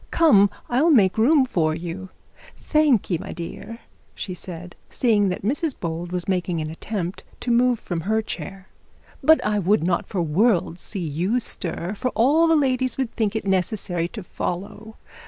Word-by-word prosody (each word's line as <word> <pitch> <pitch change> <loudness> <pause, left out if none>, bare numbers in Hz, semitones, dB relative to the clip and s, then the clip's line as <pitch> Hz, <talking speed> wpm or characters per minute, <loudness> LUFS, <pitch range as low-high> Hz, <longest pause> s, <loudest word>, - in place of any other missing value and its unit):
Come 205 -12 +5 0.2
I'll 270 +7 +2
make 200 - +5
room 270 +4 +5
for 160 -9 0
you. 175 +3 -6 0.5
Thank'ee 265 - +2
my - - -7
dear,' 205 +6 -8 0.3
she 185 - -5
said, 180 -1 -8
seeing 210 -5 +2
that 180 - -4
Mrs 285 - -1
Bold 170 +1 -4
was 180 -1 -3
making 180 -3 -1
an 155 0 -4
attempt 185 +1 -5 0.2
to 245 - -1
move 245 +1 +3
from 170 -2 -4
her 220 +5 0
chair, 195 -2 -7 0.5
'but 315 0 +5
I 210 0 +1
would 200 0 +2
not 170 0 0
for - - -6
the 175 - +2
world 180 -2 +2
see 200 - -1
you 180 +11 0
stir, 180 -4 -3
for 255 +5 -2
all 295 +8 +4
the 325 - +4
ladies 260 -3 +1
would 260 -4 -1
think 220 -2 0
it 220 - -2
necessary 185 -2 0
to 210 +3 -8
follow. 205 +5 -5
200 Hz, 175 wpm, -23 LUFS, 175-245 Hz, 0.5 s, Come